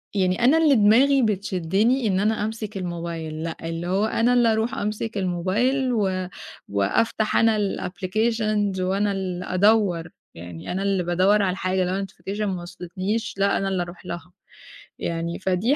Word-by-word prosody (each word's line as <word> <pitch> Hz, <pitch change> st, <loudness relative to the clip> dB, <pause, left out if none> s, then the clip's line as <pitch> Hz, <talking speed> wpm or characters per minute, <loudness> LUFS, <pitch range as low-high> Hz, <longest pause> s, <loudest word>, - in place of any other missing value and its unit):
يعني 185 Hz, +2 st, +1 dB
أنا 270 Hz, +6 st, +6 dB
اللي 310 Hz, -4 st, +5 dB
دماغي 255 Hz, +6 st, +5 dB
بتشدِّني 205 Hz, +3 st, +1 dB
إن 190 Hz, -2 st, +1 dB
أنا 210 Hz, +1 st, +1 dB
أمسك 215 Hz, -2 st, -5 dB
الموبايل، 170 Hz, -3 st, -5 dB
لأ، 165 Hz, 0 st, -4 dB
اللي 165 Hz, +1 st, -4 dB
هو 195 Hz, +4 st, +1 dB
أنا 230 Hz, +2 st, +2 dB
اللي 240 Hz, -2 st, +4 dB
أرُوح 220 Hz, +2 st, -1 dB
أمسك 210 Hz, +1 st, -3 dB
الموبايل 205 Hz, +9 st, 0 dB
و 190 Hz, -4 st, 0 dB, 0.4 s
وأفتح 210 Hz, -, 0 dB
أنا 225 Hz, -1 st, +4 dB
الapplications، 210 Hz, +1 st, -1 dB
وأنا 195 Hz, +3 st, +1 dB
اللي 185 Hz, -2 st, -3 dB
أدوّر، 185 Hz, -3 st, +2 dB, 0.3 s
يعني 85 Hz, 0 st, -8 dB
أنا 190 Hz, +2 st, -2 dB
اللي 195 Hz, -2 st, +1 dB
بادوّر 185 Hz, +4 st, +3 dB
على 190 Hz, -2 st, +1 dB
الحاجة، 185 Hz, 0 st, 0 dB
لو 190 Hz, +2 st, -1 dB
notification 200 Hz, +1 st, -7 dB
ما 190 Hz, -4 st, -1 dB
وصلتنيش، 185 Hz, +5 st, -4 dB
لأ، 200 Hz, 0 st, +2 dB
أنا 195 Hz, -, -1 dB
اللي 190 Hz, -2 st, 0 dB
أرُوح 175 Hz, +1 st, -11 dB
لها، 170 Hz, 0 st, -7 dB, 0.7 s
يعني 170 Hz, 0 st, -3 dB
فدي 190 Hz, +8 st, +1 dB
195 Hz, 155 wpm, -24 LUFS, 180-220 Hz, 0.7 s, أنا